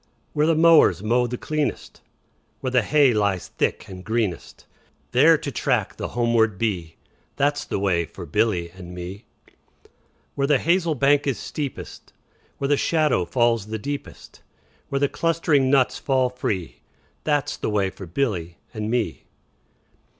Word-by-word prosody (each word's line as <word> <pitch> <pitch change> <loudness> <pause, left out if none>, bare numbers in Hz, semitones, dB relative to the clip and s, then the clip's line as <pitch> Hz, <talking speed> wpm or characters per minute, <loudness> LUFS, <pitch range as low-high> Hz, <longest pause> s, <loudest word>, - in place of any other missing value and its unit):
Where 150 +1 +2
the 165 - +3
mowers 160 - +5
mow 120 +3 +2
the 125 +1 -4
cleanest, 155 +2 -3 0.6
Where 130 - -3
the 125 -1 +4
hay 140 +2 +4
lies 100 -4 0
thick - - -2
and 90 -1 -9
greenest, 110 -5 -2
10 - - -27 0.5
There - - +6
to - - -5
track - - -1
the - - -3
homeward 115 -4 +1
bee, 90 -7 -2 0.4
That 145 +1 +1
's - - -6
the - - -3
way 90 -4 +1
for - - -10
Billy 90 -7 0
and 90 -1 -11
me. 90 +4 -8 1.1
Where 140 0 0
the 145 -1 +4
hazel 170 +1 +1
bank 140 +2 +3
is 135 - 0
steepest, 145 -3 -7 0.4
Where 140 - -2
the 145 0 +3
shadow 150 - +1
falls 115 0 +1
the 110 0 -3
deepest, 140 +6 -7 0.5
Where 140 - -1
the 140 +1 +2
clustering 160 -4 +1
nuts 135 -2 +2
fall 130 -2 +1
free, 100 -8 -2
15 - - -27 0.4
That 145 -3 +1
's - - -5
the - - -3
way 100 -3 0
for 95 -2 -10
Billy 85 -5 -2 0.2
and 110 -1 -4
me. 120 -1 -2
120 Hz, 165 wpm, -23 LUFS, 100-140 Hz, 1.1 s, There